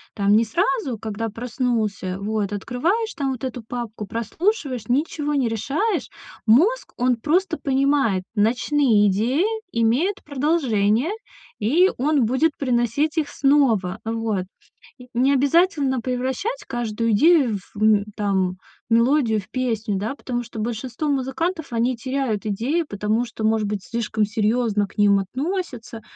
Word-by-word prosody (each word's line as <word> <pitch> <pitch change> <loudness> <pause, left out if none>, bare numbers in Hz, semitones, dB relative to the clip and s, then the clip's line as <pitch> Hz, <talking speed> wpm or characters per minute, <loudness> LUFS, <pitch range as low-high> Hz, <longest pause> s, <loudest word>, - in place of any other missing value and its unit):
там 200 0 +3
не 225 - +5
сразу, 270 - 0
когда 220 +1 -4
проснулся. 225 -5 -2
Вот 210 0 -2
открываешь 330 - -1
там 280 -4 -2
вот 255 -1 -6
эту 255 -2 -4
папку, 225 -2 -6
прослушиваешь, 255 - -2
ничего 295 +3 0
не 255 -5 +1
решаешь. 280 - -1 0.4
Мозг 355 - +3
он 250 0 +2
просто 325 +8 0
понимает, 270 -8 +1
ночные 230 +1 +3
идеи 240 - +1 0.3
имеют 265 - +1
продолжение, 265 - +1 0.5
и 320 - +3
он 285 -2 +2
будет 270 +7 +1
приносить 255 +4 0
их 300 - -2
снова. 250 -10 +2
Вот. 225 -4 -2 0.5
И 250 -1 -13
не 255 +3 +3
обязательно 285 -2 +2
превращать 260 - -2
каждую 230 -2 -1
идею, 265 -1 +4 0.2
в, 205 - -7
м, 210 -2 +4
там 190 -3 0 0.3
мелодию 235 -1 +3
в 195 - -10
песню, 225 -5 -1
да. 220 +7 -3
Потому 245 -3 -4
что 235 -1 -9
большинство 240 +5 -3
музыкантов 290 +4 -2
они 240 +2 +1
теряют 255 -3 -2
идеи, 235 - 0
потому 210 +4 0
что 230 -2 -7
может 220 -1 +2
быть 200 -2 -3
слишком 225 -2 -1
серьезно 215 -1 0
к - - -21
ним 205 -1 +5
относятся. 255 - -4
240 Hz, 135 wpm, -22 LUFS, 215-285 Hz, 0.5 s, не